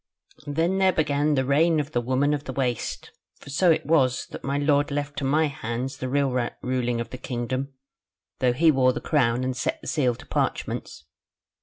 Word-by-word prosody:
"There 160 +3 +1
then 190 0 +2
began 150 -1 +1
the 130 -1 +1
reign 155 +4 +3
of 145 0 -3
the 120 - 0
Woman 130 +4 +1
of 145 0 -3
the 130 - -5
Waste; 125 -3 -2 0.3
for 140 - -12
so 175 +6 +3
it 160 - +2
was, 135 -6 +2
that - - -8
my 140 +1 -1
lord 145 0 +2
left 145 0 -3
to - - -5
my 150 +4 +3
hands 130 -1 -4
the 130 -1 -4
real 140 0 +1 0.3
ruling 125 -2 -1
of 115 0 -5
the 125 - -7
kingdom, 130 +3 -3 0.7
though 125 -1 +3
he 160 +5 +4
wore 130 -2 +3
the - - -3
crown 125 -5 +1
and 130 0 -2
set 125 - -2
the - - -11
seal 125 -5 +1
to - - -14
parchments. 75 - -3
135 Hz, 200 wpm, -25 LUFS, 125-150 Hz, 0.7 s, he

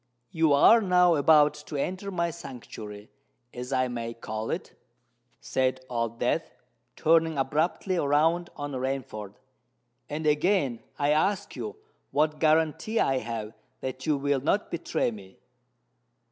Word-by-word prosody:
"You 160 -3 +2
are 225 +11 +7
now 180 -3 +4
about 150 0 +5
to 150 - -6
enter 185 +7 -3
my 170 -3 -1
sanctuary—as 120 -1 -10
I 130 -1 +2
may 115 -1 -5
call 110 -1 -5
it," - - -4 0.7
said 130 0 -1
Old 115 -1 -2
Death, - - -1 0.4
turning 160 -1 +3
abruptly 160 +7 0
round 165 +4 +2
on 145 0 -5
Rainford; 130 -6 -4 0.7
"and 155 +2 -4
again 150 - +2 0.2
I 145 0 +2
ask 190 +6 +1
you 425 - -5 0.3
what 150 +1 +1
guarantee 160 +7 +2
I 135 -1 +2
have 110 -2 -5 0.3
that 130 +1 -5
you 150 -2 +3
will 140 -1 0
not 200 +9 0
betray 170 -7 -1
me?" 95 -3 -12
145 Hz, 130 wpm, -27 LUFS, 125-165 Hz, 0.7 s, are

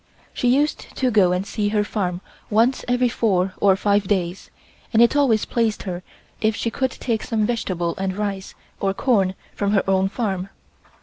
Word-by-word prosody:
She 245 - -1
used 285 +5 +1
to 255 -2 +1
go 195 -5 +4
and 180 +2 -1
see 205 0 -1
her 210 0 +1
farm 185 -4 -2 0.3
once 230 +5 +2
every 245 0 +2
four 195 -6 +1
or 195 -2 +5
five 200 0 +1
days, 185 -2 -1 0.4
and 225 - +3
it 235 +4 +5
always 255 -7 +3
pleased 230 -3 0
her 180 -3 -4 0.4
if 220 -1 +2
she 230 - -2
could 260 +3 0
take 230 -3 -2
some 220 -2 0
vegetables 185 -6 -2
and 190 0 -2
rice 200 -2 -4 0.2
or 195 0 0
corn 195 -8 +2 0.2
from 200 0 0
her 195 - +2
own 190 0 +2
farm. 195 -4 -2
205 Hz, 180 wpm, -22 LUFS, 190-230 Hz, 0.4 s, or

